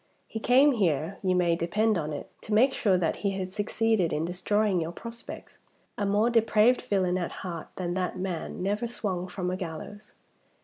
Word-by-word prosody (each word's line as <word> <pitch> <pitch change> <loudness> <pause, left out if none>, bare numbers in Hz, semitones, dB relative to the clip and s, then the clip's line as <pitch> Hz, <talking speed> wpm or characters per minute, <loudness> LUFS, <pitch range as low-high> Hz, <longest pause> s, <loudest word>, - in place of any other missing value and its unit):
He 220 - -6
came 260 +6 +5
here, 175 - 0
you 185 -1 +1
may 175 -2 +3
depend 210 +6 +1
on 155 -3 -2
it, 145 - -5
to 215 - -2
make 260 +5 +5
sure 195 -5 +2
that 170 -3 0
he 195 -1 -1
had 185 -1 -4
succeeded 210 -3 +1
in 155 +2 0
destroying 190 +2 +1
your 165 +1 -3
prospects. 230 +6 -9 0.4
A 205 - -1
more 210 +4 +3
depraved 230 +1 +4
villain 185 -2 +1
at 175 - -3
heart 170 -3 -5
than 175 -2 -2
that 185 0 -2
man 180 -1 -4
never 210 +4 0
swung 190 -6 -3
from 180 0 -3
a - - -1
gallows!" 190 +4 -7
190 Hz, 185 wpm, -28 LUFS, 175-215 Hz, 0.4 s, came